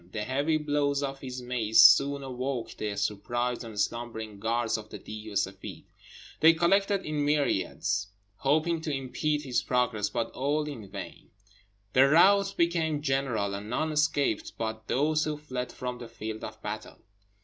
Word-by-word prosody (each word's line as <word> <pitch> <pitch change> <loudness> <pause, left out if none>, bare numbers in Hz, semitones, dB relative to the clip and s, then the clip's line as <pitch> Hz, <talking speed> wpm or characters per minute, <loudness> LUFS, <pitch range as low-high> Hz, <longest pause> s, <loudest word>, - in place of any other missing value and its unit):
The 105 - -2
heavy 140 +6 +1
blows 145 -2 0
of 135 -1 -4
his 130 -2 -6
mace 115 -3 +1
soon 140 +7 +7
awoke 130 -1 -4
the 105 -1 -3
surprised 120 +5 -1
and 110 -3 -7
slumbering 110 -3 -3
guards 115 +2 0
of 110 -1 -6
the - - -7
Deev 110 0 -9
e 105 - -8
Seffeed; 95 0 -3 0.6
they 160 +1 +7
collected 195 +4 +2
in 150 -1 -1
myriads, 105 -8 0 0.3
hoping 160 +4 +1
to 160 - -3
impede 145 +3 -1
his 130 -3 0
progress, 125 -5 0
but 115 +2 -2
all 145 +3 0
in 115 -9 -7
vain. 100 +1 -9 0.6
The 135 +2 +6
rout 195 +5 +5
became 160 -3 +1
general, 135 -8 0
and 100 +2 -6
none 155 +6 -1
escaped 150 -6 +1
but 110 0 -4
those 155 +3 +1
who 155 -1 -2
fled 130 -4 -5
from 125 -1 -5
the 120 - -8
field 110 -1 -7
of - - -7
battle. - - -6
130 Hz, 160 wpm, -28 LUFS, 110-150 Hz, 0.6 s, soon